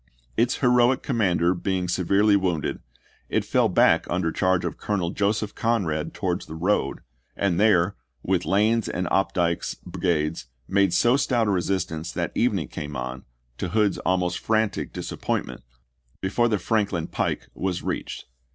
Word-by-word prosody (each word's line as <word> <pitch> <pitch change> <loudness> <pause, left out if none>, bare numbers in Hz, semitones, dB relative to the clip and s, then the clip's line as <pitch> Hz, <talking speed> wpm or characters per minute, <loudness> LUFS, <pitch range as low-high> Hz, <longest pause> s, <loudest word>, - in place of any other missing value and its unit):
Its 120 - +2
heroic 125 0 +3
commander 90 -8 +2
being 90 0 -2
se 90 - -1
verely 100 +3 +4
wounded 90 -6 0 0.5
it - - 0
fell - - +2
back - - +4
under 85 -2 0
charge 95 +1 +1
of - - -4
Colonel 95 -5 -1
Joseph 105 +1 0
Conrad 95 -10 -1
towards 90 -2 -3
the 80 - -7
road, 95 +6 0 0.4
and 95 -3 +1
there, 100 -3 +4 0.3
with 90 -1 +1
Lane's 110 +3 +2
and 90 - -2
Opdycke's 90 -3 0
brigades, 85 -6 -1 0.2
made 100 -1 +3
so 120 +8 +4
stout 120 -5 +1
a 105 - +1
re 95 -2 +1
sistance 85 -3 -2
that - - -2
evening 100 - 0
came 75 0 -6
on, 65 +1 -5 0.3
to 95 - -2
Hood's 105 0 +1
almost 90 -1 0
frantic 110 -3 0
disappointment, - - -3 0.6
before 120 +5 +1
the 110 -2 +1
Franklin 100 -4 0
pike - - -2
was 95 -2 -3
reached. - - -4
95 Hz, 150 wpm, -25 LUFS, 85-105 Hz, 0.6 s, verely